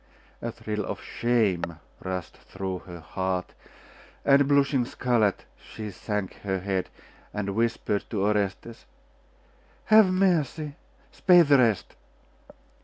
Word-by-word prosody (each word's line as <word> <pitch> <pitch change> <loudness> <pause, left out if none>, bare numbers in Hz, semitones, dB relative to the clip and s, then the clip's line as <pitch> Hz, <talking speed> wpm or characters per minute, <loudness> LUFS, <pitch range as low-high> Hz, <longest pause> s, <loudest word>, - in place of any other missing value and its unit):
A 115 - -3
thrill 105 -1 -4
of - - -5
shame 100 -9 0 0.3
rushed 95 -2 -4
through 95 -1 -6
her 85 -2 -9
heart, 95 +2 -3 0.7
and 140 0 +5
blushing 140 -2 +3
scarlet, 120 -4 0 0.2
she 110 -2 -7
sank 105 -1 -4
her 95 -1 -2
head, 95 0 -2 0.5
and 100 -1 -2
whispered 115 -2 0
to 100 -4 -1
Orestes 105 +2 -2 1.0
'Have 215 -3 +6
mercy! 165 -6 +1 0.4
spare 180 -2 +6
the 140 -3 +5
rest! 110 -8 +1
110 Hz, 110 wpm, -26 LUFS, 95-140 Hz, 1.0 s, Have